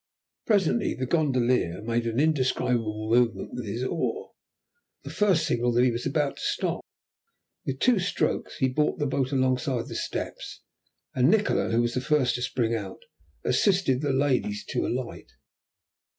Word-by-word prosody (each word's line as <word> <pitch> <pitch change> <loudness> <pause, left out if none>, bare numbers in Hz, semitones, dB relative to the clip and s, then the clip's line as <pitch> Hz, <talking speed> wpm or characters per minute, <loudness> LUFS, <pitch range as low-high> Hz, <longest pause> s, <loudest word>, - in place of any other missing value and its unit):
Presently 205 0 +2
the 130 - -3
gondolier 125 - +1
made 115 +1 -1
an 115 +2 -1
indescribable 125 -7 0
movement 120 -1 +2
with 120 -3 -5
his 115 +5 -3
oar, 425 - -2 0.7
the - - -7
first 190 -7 +2
signal 120 -2 +1
that 120 +1 +4
he 125 - +3
was 120 +2 -3
about 140 0 0
to - - -9
stop. - - -1 0.9
With 135 0 -2
two 245 -5 +4
strokes 180 - -1
he 130 - +2
brought 150 +4 0
the 145 - -1
boat 135 -1 -1
alongside 130 -1 0
the - - -6
steps, - - -5 0.5
and 130 +2 +3
Nikola, 210 +1 +2
who 115 +1 +2
was 120 0 -1
the 125 - -1
first 140 -3 +2
to 125 - -3
spring 120 -2 0
out, 100 -4 -5 0.4
assisted 140 -2 +2
the 145 -2 0
ladies 130 -6 0
to - - -1
alight. - - -5
130 Hz, 160 wpm, -26 LUFS, 120-150 Hz, 0.9 s, that